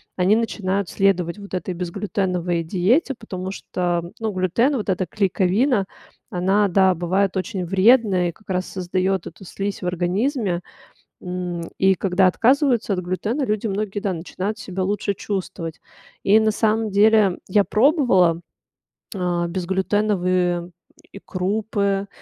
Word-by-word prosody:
они 190 +4 +3
начинают 200 -4 -1
следовать 190 -2 +1
вот 200 -2 -11
этой 180 0 -3
безглютеновой 180 -1 -2
диете, 210 - +1
потому 190 -5 -6
что, 175 -3 -2
ну, 220 -1 -1
глютен, 190 - +1
вот 210 - -4
эта 185 0 0
клейковина, 195 - +1 0.4
она, 195 +3 +2
да, 190 0 +3
бывает 185 +3 0
очень 185 -1 -3
вредная 195 -1 +4
и - - -4
как 210 +4 -25
раз 185 0 -1
создаёт 185 0 -1
эту 170 - -11
слизь 200 +3 -4
в - - -1
организме. 180 - -1 0.6
М, 180 -1 -4 0.2
и 190 0 +4
когда 190 0 +2
отказываются 240 - +2
от 180 - -1
глютена, 205 +10 -2
люди 215 0 -1
многие, 205 0 -2
да, 195 -2 -1
начинают 185 +5 -4
себя 190 0 -4
лучше 200 +1 -1
чувствовать. 180 -5 -5 0.4
И 210 +3 +5
на 220 0 +2
самом 220 0 +1
деле 205 -2 +4
я 200 +2 +3
пробовала, 210 - +3 0.7
а, 175 -2 -1
безглютеновые 185 -1 0 0.4
и 200 - -10
крупы, 200 +1 -1
190 Hz, 135 wpm, -22 LUFS, 180-210 Hz, 0.7 s, И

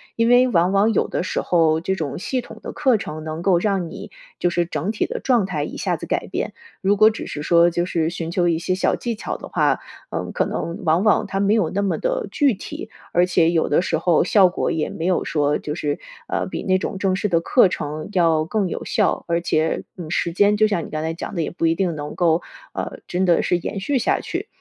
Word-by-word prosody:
因 230 0 +2
为 245 +1 +6
往 180 -5 +2
往 200 +3 +3
有 - - +1
的 - - -2
时 - - -2
候， 160 -2 +3
这 190 +3 -1
种 155 -5 -4
系 255 +7 -2
统 - - -12
的 - - -6
课 270 -6 +2
程 155 -6 -6
能 155 +1 -5
够 180 0 +3
让 190 -3 0
你 - - -9 0.3
就 175 - +2
是 175 0 0
整 165 +3 -2
体 220 - -1
的 - - -4
状 240 -6 +2
态 155 -6 -2
一 - - -6
下 - - 0
子 - - -7
改 - - -2
变。 - - -3 0.3
如 195 +2 +3
果 215 +2 +7
只 220 - -6
是 150 - -5
说 170 +2 +5
就 175 0 -1
是 165 -3 0
寻 165 -1 -4
求 175 +1 +1
一 165 -2 +1
些 185 +2 -1
小 190 - +1
技 235 -2 -3
巧 210 - -4
的 - - -9
话， - - +2 0.3
嗯， - - -3
可 - - +1
能 170 - -4
往 165 +4 +3
往 215 0 +3
它 195 0 -2
没 200 +1 +3
有 195 -8 +2
那 200 - -1
么 200 -2 0
的 - - -1
具 285 -4 +3
体， 185 - -8 0.2
而 175 +1 +4
且 170 -2 +3
有 165 -2 +1
的 150 - +3
时 170 -2 0
候 165 0 +3
效 190 +1 +5
果 - - -1
也 155 - -1
没 165 - -5
有 185 - +1
说 150 -2 +1
就 150 - -5
是， 145 -3 -2 0.3
呃， - - -1
比 - - -5
那 185 -1 +2
种 195 - -4
正 190 -2 +1
式 200 - -1
的 170 -4 +2
课 205 +5 +5
程 155 -3 -4
要 165 -4 +3
更 205 +2 0
有 - - -5
效， - - 0
而 170 0 +1
且， 160 -2 0 0.2
嗯， 165 -3 -7
时 170 - 0
间 205 +4 +3
就 215 +1 +4
像 200 -6 -1
你 - - -10
刚 155 - -2
才 160 +1 -2
讲 - - -6
的， 170 - -1
也 155 - -2
不 165 - -2
一 165 - +4
定 175 -1 -1
能 145 0 -6
够 170 -2 +2 0.3
呃， - - -5
真 180 +1 0
的 175 -2 +4
是 180 - +1
延 185 +3 -4
续 270 +8 0
下 245 - +1
去。 - - -5
175 Hz, 275 characters per minute, -21 LUFS, 165-200 Hz, 0.3 s, 果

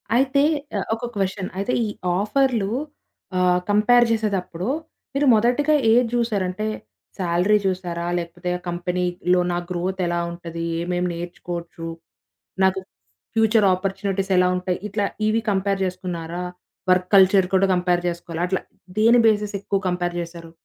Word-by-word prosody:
అయితే 270 +2 +3 0.4
ఆహ్, - - -2
ఒక 240 +2 -5
క్వెషన్ 195 -1 -2
అయితే, 200 +6 -1
ఈ - - -2 0.3
ఆఫర్లు 225 -1 +1 0.7
ఆహ్, 180 0 +3
కంపేర్ 240 +4 +5
జేసేదప్పుడు, 195 -5 -1 0.5
మీరు 280 +1 +1
మొదటిగా 250 +7 +3 0.2
ఏది 245 +2 +5
జూసారు? 230 -5 +1
అంటే 215 +4 -3 0.5
సాలరీ 180 +3 +3
చూసారా? 175 -2 -2
లేకపోతే 175 +1 -4
ఆ - - -14
కంపెనీలో 180 0 0
నా 175 - 0
గ్రోత్ 185 +1 -2
ఎలా 175 0 0
ఉంటది? 170 -1 -6 0.2
ఏమెం 180 +1 -1
నేర్చుకోవచ్చు? 170 -1 -6 0.8
నాకు 190 0 +2 0.6
ఫ్యూచర్ 220 -1 +4
అపార్చునిటీస్ 195 0 -2
ఎలా 180 0 +4
ఉంటాయి? 180 0 -2
ఇట్లా 205 0 -1 0.2
ఇవి 225 +1 +2
కంపేర్ 195 0 0
చేసుకున్నారా? 180 -2 -4 0.5
వర్క్ 180 0 +3
కల్చర్ 190 -1 +6
కూడా 190 +1 +4
కంపేర్ 180 -1 +1
చేసుకోవాలి. 170 -1 -5
అట్లా, 190 +1 -1 0.4
దేని 230 +2 +6
బేసిస్ 210 -1 +2
ఎక్కువ 200 -1 -1
కంపేర్ 175 -1 -1
జేసారు? 170 -1 -8
185 Hz, 135 wpm, -22 LUFS, 175-210 Hz, 0.8 s, కల్చర్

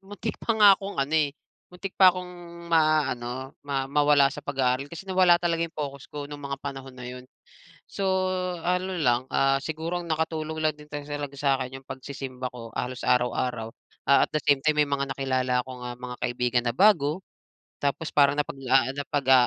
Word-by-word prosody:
muntik 205 +2 -6
pa 230 - 0
nga 205 -2 +9
akong 200 +1 -6
ano, 135 +2 -1
eh, 150 -3 +2 0.3
muntik 185 +2 -7
pa 190 - +9
akong 180 0 -2 0.4
maano 135 -5 +1
ma 140 -2 -2
mawala 145 -1 +4
sa 150 - -7
pag-aaral. 135 -1 0
Kasi 170 +4 -9
nawala 185 -2 +5
talaga 170 -1 -1
'yong 165 - -18
focus 140 -2 -5
ko 145 -1 -6
nung 145 0 -8
mga 140 -1 -4
panahon 135 -2 -7
na 125 - -8
yun. 125 0 -8 0.6
So, 200 - -6 0.6
ano 180 +1 0
lang, 125 -3 +1
ah, 135 0 +2
siguro 165 +3 -3
ang 170 - -10
nakatulong 160 0 -2
lang 155 -1 +1
din 150 0 -16
ta 145 - -4
sa 145 0 -4
laga 140 -1 -6
sa'kin 135 -2 0
yung 135 - -21
pagsisimba 130 -1 -6
ko 115 -2 -10
halos 125 0 -4
araw-araw. 125 -2 +1 0.4
Ah, 140 - +6
at - - -33
the 155 - +2
same 140 -2 +3
time, 155 -1 +3
may 145 - -2
mga 140 -1 -1
nakilala 130 -2 0
kong, 130 -1 -9
ah, 120 0 -5
mga 125 0 -7
kaibigan 120 0 0
na 120 - 0
bago. 180 - +4 0.6
Tapos 145 +3 -1
parang 140 -1 +4
napaglaanap 135 -1 0
pag 140 -2 0
ah, 130 -2 +7
140 Hz, 190 wpm, -26 LUFS, 130-160 Hz, 0.6 s, nga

